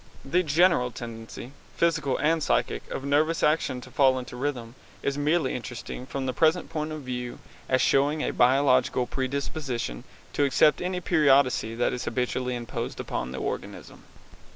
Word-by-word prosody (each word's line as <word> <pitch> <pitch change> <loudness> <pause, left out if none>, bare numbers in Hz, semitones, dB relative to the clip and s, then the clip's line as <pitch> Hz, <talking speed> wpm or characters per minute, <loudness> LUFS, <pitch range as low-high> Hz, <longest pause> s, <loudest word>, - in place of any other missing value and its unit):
The 175 +7 +2
general 165 -4 +3
tendency, 115 +1 -8 0.3
physical 155 -6 +1
and 160 +2 +2
psychic, - - 0
of 135 - -5
nervous 150 +4 +1
action 150 -5 +1
to - - -12
fall 135 -3 +4
into 125 -1 -6
rhythm 125 -3 -3 0.3
is 140 - 0
merely 150 0 +1
interesting 125 +1 -6
from 135 -1 -4
the 130 - -1
present 160 +6 +2
point 155 0 -3
of 155 -1 -5
view 125 -1 -5 0.3
as 130 0 +3
showing 145 +3 +2
a - - 0
biological 130 -1 +3
predisposition 130 - -3 0.3
to 145 - +1
accept 140 +2 +4
any 180 0 -2
periodicity 140 -9 +3
that 120 - +1
is 125 - -4
habitually 125 +1 -1
imposed 120 -1 -5
upon 65 0 -3
the 65 - -6
organism. - - -6
135 Hz, 155 wpm, -26 LUFS, 125-150 Hz, 0.3 s, fall